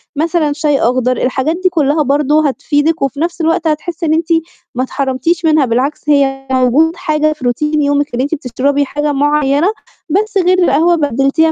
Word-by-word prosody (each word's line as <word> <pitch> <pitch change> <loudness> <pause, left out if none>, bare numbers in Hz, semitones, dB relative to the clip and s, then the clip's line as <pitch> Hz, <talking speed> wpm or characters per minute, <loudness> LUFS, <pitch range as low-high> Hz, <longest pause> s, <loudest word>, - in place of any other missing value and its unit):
مثلًا 315 -1 0
شاي 295 -2 0
أخضر، 255 +1 +1
الحاجات 260 +5 -1
دي 370 - +4
كلّها 305 -2 +1
برضو 290 +2 +1
هتفيدِك 290 +2 0
وفي 275 +1 -2
نفْس 335 0 -2
الوقت 325 0 0
هتحسّي 330 +2 -3
إن 310 - +1
أنتِ 320 0 0 0.5
ما 255 - 0
اتحرمتيش 275 +6 -2
منها، 310 -3 +3
بالعكس 265 +6 -2
هي 270 -2 +1
موجود 260 +6 +2
حاجة 310 -3 0
في 270 -5 -9
routine 300 +5 0
يومِك 285 -2 0
أن 250 - -1
أنتِ 290 +4 -1
بتشربي 280 +2 -1
حاجة 295 +2 -2
معيّنة 290 +2 +1 0.4
بس 410 +4 0
غير 365 0 +3
القهوة 335 +4 +3
بدّلتيها 290 +2 +1
295 Hz, 170 wpm, -14 LUFS, 275-320 Hz, 0.5 s, دي